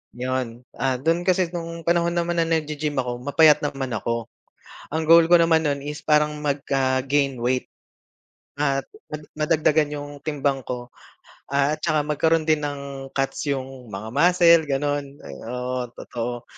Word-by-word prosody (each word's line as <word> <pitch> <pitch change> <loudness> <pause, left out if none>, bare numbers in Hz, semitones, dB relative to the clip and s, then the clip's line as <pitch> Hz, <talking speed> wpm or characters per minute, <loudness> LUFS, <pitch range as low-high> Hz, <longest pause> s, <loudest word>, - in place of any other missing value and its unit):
'Yon. 125 -1 -3 0.2
Ah, 130 0 +1
do'n 165 +7 0
kasi 180 -2 +2
no'ng 170 -1 -6
panahon 170 0 +1
naman 170 0 0
na 165 - +2
nag-ge-gym 150 -2 -1
ako, 125 -2 -2
mapayat 155 +1 +6
naman 135 -3 -3
ako. 115 +1 -2 0.6
Ang 160 +1 -2
goal 165 +1 +7
ko 175 - +8
naman 165 -1 +4
no'n 145 -2 0
is 150 +1 -6
parang 150 0 +2
magka-gain 135 -1 0
weight. 125 +2 -1 0.9
At 140 -2 0 0.3
mad 150 0 -5
madagdagan 155 -1 +2
'yong 145 0 -5
timbang 140 -3 -1
ko 125 -1 -5 0.6
at 140 +2 +1
saka 155 -3 +1
magkaroon 160 +2 +2
din 155 -1 +3
ng 140 -2 -5
cuts 135 +2 -1
'yong 130 -2 -5
mga 100 +2 -6
muscle 170 +1 +5
gano'n. 145 +1 0 0.2
Eh, - - -9
oo, 125 0 -3
totoo. 120 0 -5
145 Hz, 150 wpm, -23 LUFS, 130-160 Hz, 0.9 s, ko